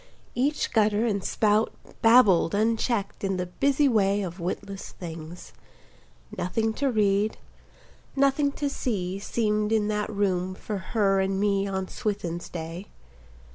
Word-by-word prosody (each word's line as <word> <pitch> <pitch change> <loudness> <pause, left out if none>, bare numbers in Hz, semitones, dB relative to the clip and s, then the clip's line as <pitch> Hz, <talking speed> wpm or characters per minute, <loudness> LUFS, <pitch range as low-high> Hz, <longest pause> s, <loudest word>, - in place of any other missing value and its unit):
Each 280 +5 0
gutter 215 0 +2
and 200 -4 -1
spout 215 +1 +2 0.3
Babbled 225 -7 +5
unchecked 220 -1 0
in 195 -1 0
the 180 - -1
busy 275 +10 +2
way 205 -4 +2
Of 180 0 -6
witless 195 +3 -5
things: 165 0 -9 0.8
Nothing 220 +5 -1
to 280 - +3
read, 210 -2 +1 0.8
nothing 275 +1 +2
to 290 - -2
see 195 -9 -2
Seemed 210 0 0
in 215 -1 +2
that 210 0 -1
room 185 -3 -1
for 205 +1 -5 0.2
her 195 -2 +3
and 190 0 0
me 200 -1 +1
On 190 -1 -3
Swithin's 185 -6 -4
day. 165 +3 -6
205 Hz, 135 wpm, -26 LUFS, 190-225 Hz, 0.8 s, Babbled